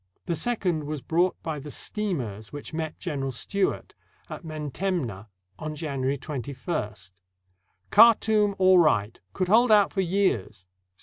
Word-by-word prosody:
The 170 Hz, -, -1 dB
second 180 Hz, -7 st, 0 dB
was 150 Hz, 0 st, -4 dB
brought 175 Hz, +3 st, +1 dB
by 155 Hz, -3 st, -3 dB
the 145 Hz, +2 st, -9 dB
steamers 125 Hz, -, -4 dB
which 145 Hz, +2 st, -8 dB
met 160 Hz, -1 st, -4 dB
General 140 Hz, -6 st, -3 dB
Stewart 195 Hz, +10 st, -2 dB, 0.4 s
at -, -, -6 dB
Mentemneh 150 Hz, -, -3 dB, 0.3 s
on 155 Hz, 0 st, -5 dB
January 140 Hz, -3 st, -2 dB
21st: 125 Hz, -, -5 dB, 0.8 s
"Khartoum 215 Hz, -2 st, +5 dB
all 185 Hz, -1 st, +6 dB
right; 115 Hz, -10 st, +2 dB
could 185 Hz, -, -1 dB
hold 225 Hz, +4 st, +5 dB
out 205 Hz, -2 st, +5 dB
for 195 Hz, -, +1 dB
years. 170 Hz, -, 0 dB
160 Hz, 130 wpm, -26 LUFS, 135-190 Hz, 0.8 s, all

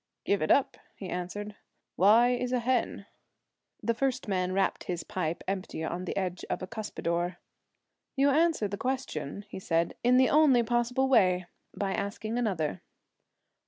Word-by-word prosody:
'Give 200 Hz, -, +1 dB
it 155 Hz, -, 0 dB
up,' 275 Hz, -, +3 dB, 0.2 s
he 190 Hz, -, -7 dB
answered. 205 Hz, +4 st, -5 dB, 0.4 s
'Why 220 Hz, +6 st, +6 dB
is 250 Hz, 0 st, -1 dB
a 255 Hz, -, +2 dB
hen?' 240 Hz, -4 st, 0 dB, 0.8 s
The 230 Hz, +2 st, +2 dB
first 260 Hz, +1 st, -1 dB
man 185 Hz, -2 st, 0 dB
rapped 195 Hz, +1 st, 0 dB
his 175 Hz, -2 st, -3 dB
pipe 170 Hz, -3 st, -3 dB
empty 190 Hz, -4 st, -3 dB
on 175 Hz, +3 st, -3 dB
the -, -, -4 dB
edge 185 Hz, -2 st, -2 dB
of -, -, -2 dB
a -, -, -4 dB
cuspidor. 180 Hz, -5 st, -3 dB, 0.8 s
'You 280 Hz, +1 st, +4 dB
answer 315 Hz, -6 st, +2 dB
the 200 Hz, +1 st, -5 dB
question,' 205 Hz, -, -3 dB
he 200 Hz, -, -7 dB
said, 165 Hz, -2 st, 0 dB
'in 250 Hz, +1 st, +5 dB
the 260 Hz, -1 st, +5 dB
only 285 Hz, -5 st, +5 dB
possible 240 Hz, +3 st, +1 dB
way 185 Hz, -8 st, +4 dB, 0.3 s
by 195 Hz, -1 st, -1 dB
asking 215 Hz, +3 st, -3 dB
another.' 165 Hz, -, -1 dB
205 Hz, 160 wpm, -29 LUFS, 180-245 Hz, 0.8 s, Why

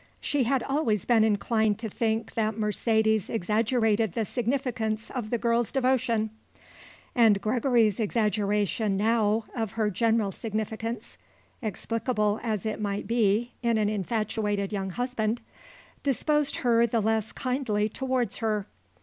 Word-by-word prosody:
She 280 Hz, -4 st, 0 dB
had 265 Hz, +1 st, +1 dB
always 255 Hz, -, 0 dB
been 230 Hz, -3 st, +4 dB
inclined 220 Hz, 0 st, +2 dB
to 225 Hz, 0 st, -4 dB
think 220 Hz, +1 st, -1 dB
that 220 Hz, -1 st, -1 dB
Mercedes 220 Hz, 0 st, +1 dB
exaggerated 220 Hz, 0 st, +1 dB
the 225 Hz, +1 st, -1 dB
significance 230 Hz, -3 st, -2 dB
of 240 Hz, -5 st, -4 dB
the 240 Hz, -, +1 dB
girl's 235 Hz, -1 st, +1 dB
devotion, 245 Hz, -5 st, +1 dB, 0.8 s
and 225 Hz, -5 st, +5 dB
Gregory's 230 Hz, -1 st, +2 dB
exaggeration, 210 Hz, -2 st, 0 dB
now, 220 Hz, 0 st, +2 dB
of 225 Hz, -5 st, -2 dB
her 220 Hz, -2 st, 0 dB
general 220 Hz, 0 st, +1 dB
significance 220 Hz, +3 st, -4 dB, 0.4 s
explicable 215 Hz, 0 st, -1 dB
as 215 Hz, -4 st, -2 dB
it 215 Hz, 0 st, -2 dB
might 200 Hz, -1 st, -2 dB
be 230 Hz, +1 st, +1 dB
in 235 Hz, -2 st, +2 dB
an 210 Hz, -1 st, +2 dB
infatuated 210 Hz, 0 st, -1 dB
young 195 Hz, -1 st, -2 dB
husband 235 Hz, +1 st, -1 dB, 0.6 s
disposed 295 Hz, +2 st, +1 dB
her 235 Hz, -2 st, +3 dB
the 230 Hz, 0 st, +1 dB
less 220 Hz, 0 st, 0 dB
kindly 250 Hz, -5 st, -1 dB
towards 255 Hz, -1 st, -2 dB
her. 215 Hz, -3 st, -1 dB
220 Hz, 130 wpm, -27 LUFS, 210-235 Hz, 0.8 s, and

